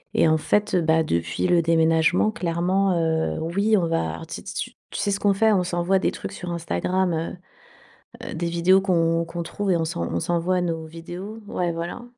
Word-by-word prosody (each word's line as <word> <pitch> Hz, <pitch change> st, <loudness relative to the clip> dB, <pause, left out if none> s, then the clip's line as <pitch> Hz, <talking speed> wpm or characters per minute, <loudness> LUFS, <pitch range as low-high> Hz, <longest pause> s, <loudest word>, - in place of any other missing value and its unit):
Et -, -, +4 dB
en 160 Hz, 0 st, +4 dB
fait, 205 Hz, +6 st, +1 dB
heu, 180 Hz, -, +3 dB
bah 160 Hz, 0 st, +3 dB
depuis 85 Hz, -, -1 dB
le 175 Hz, -1 st, +4 dB
déménagement, 165 Hz, +3 st, +3 dB
clairement, 185 Hz, -1 st, 0 dB
heu, 160 Hz, -1 st, 0 dB
oui, 200 Hz, +7 st, +1 dB
on 175 Hz, -3 st, +1 dB
va, 120 Hz, -, 0 dB
alors 85 Hz, -, -8 dB
tu -, -, -6 dB
sais -, -, -8 dB
tu -, -, -4 dB
s -, -, -33 dB, 0.2 s
tu -, -, -4 dB
sais -, -, 0 dB
ce 200 Hz, 0 st, 0 dB
qu'on 200 Hz, -1 st, +3 dB
fait? 220 Hz, +3 st, +3 dB
On 185 Hz, -3 st, +2 dB
s'envoie 175 Hz, +2 st, +1 dB
des 190 Hz, -, +1 dB
trucs -, -, -7 dB
sur 175 Hz, -1 st, -6 dB
Instagram, 170 Hz, -, -1 dB
heu 165 Hz, +3 st, -3 dB, 0.9 s
heu, -, -, -5 dB
des 170 Hz, +1 st, -2 dB
vidéos 175 Hz, +3 st, +4 dB
qu'on 165 Hz, -3 st, +2 dB
qu'on 170 Hz, +1 st, -5 dB
trouve 195 Hz, +3 st, -2 dB
et 175 Hz, -, +3 dB
on 165 Hz, -, -1 dB
s'en 85 Hz, -, -3 dB
on 85 Hz, -, -1 dB
s'envoie 175 Hz, -, 0 dB
nos 165 Hz, -2 st, -2 dB
vidéos. 175 Hz, +6 st, -8 dB
Ouais, 175 Hz, -3 st, -1 dB
voilà. 170 Hz, +8 st, -5 dB
170 Hz, 220 wpm, -24 LUFS, 165-185 Hz, 0.9 s, Et